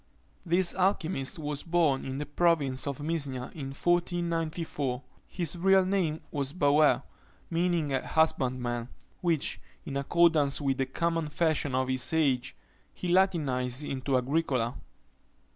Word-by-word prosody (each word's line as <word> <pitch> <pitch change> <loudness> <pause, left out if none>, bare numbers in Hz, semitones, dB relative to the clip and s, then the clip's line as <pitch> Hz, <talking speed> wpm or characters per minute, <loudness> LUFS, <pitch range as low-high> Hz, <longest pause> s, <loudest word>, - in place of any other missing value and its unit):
This 175 +1 +2
alchymist 180 -7 0
was 150 -2 -4
born 165 -6 +1
in 130 0 -4
the 150 - -3
province 145 -4 +1
of 140 +1 -4
Misnia, 140 -6 -3
in 140 -4 -6
1494. 165 -4 -1 0.2
His 175 -1 -2
real 190 +2 +4
name 180 -5 0
was 140 -2 -2
Bauer, 150 -2 +4 0.5
meaning 165 -4 +1
a 130 - -1
husbandman, 125 -6 0 0.3
which, 165 -5 0 0.2
in 140 - -5
accordance 150 -1 +3
with 135 -3 -1
the 135 - +1
common 165 +3 -1
fashion 150 -3 0
of 130 0 +1
his 130 -1 +1
age, 140 -5 +1 0.4
he 180 - -5
latinised 145 -8 +1
into 135 0 0
Agricola. 130 -3 0
150 Hz, 125 wpm, -29 LUFS, 135-170 Hz, 0.5 s, real